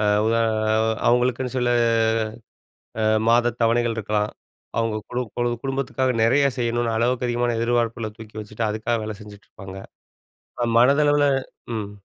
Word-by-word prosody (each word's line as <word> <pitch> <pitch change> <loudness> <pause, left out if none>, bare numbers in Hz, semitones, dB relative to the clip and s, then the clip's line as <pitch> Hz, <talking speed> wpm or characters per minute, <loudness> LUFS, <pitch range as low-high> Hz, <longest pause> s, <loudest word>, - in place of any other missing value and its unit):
ஆ - - 0 0.2
உத 115 - +2 0.7
அவங்களுக்குன்னு 125 +1 +1
சில 125 -1 +1 1.3
ஆ - - +1 0.2
மாத 120 +1 +3
தவணைகள் 115 0 +2
இருக்கலாம். 105 0 -1 0.5
அவங்க 115 -1 0
குடும் 125 -2 -3
குடும் 120 -1 -1
குடும்பத்துக்காக 135 -1 -1
நெறைய 135 +5 +4
செய்யணுனு 120 -1 0
அளவுக்கு 125 +2 +1
அதிகமான 120 0 0
எதிர்பார்ப்புல 115 -1 0
தூக்கி 110 -1 -12
வச்சுட்டு 105 +1 -4
அதுக்காக 110 +2 -1
வேலை 110 0 -5
செஞ்சுட்ருப்பாங்க. 100 -2 -12 1.0
மனதளவுல 145 +3 +4 0.5
ம். 105 -2 -4
120 Hz, 120 wpm, -23 LUFS, 110-125 Hz, 1.3 s, நெறைய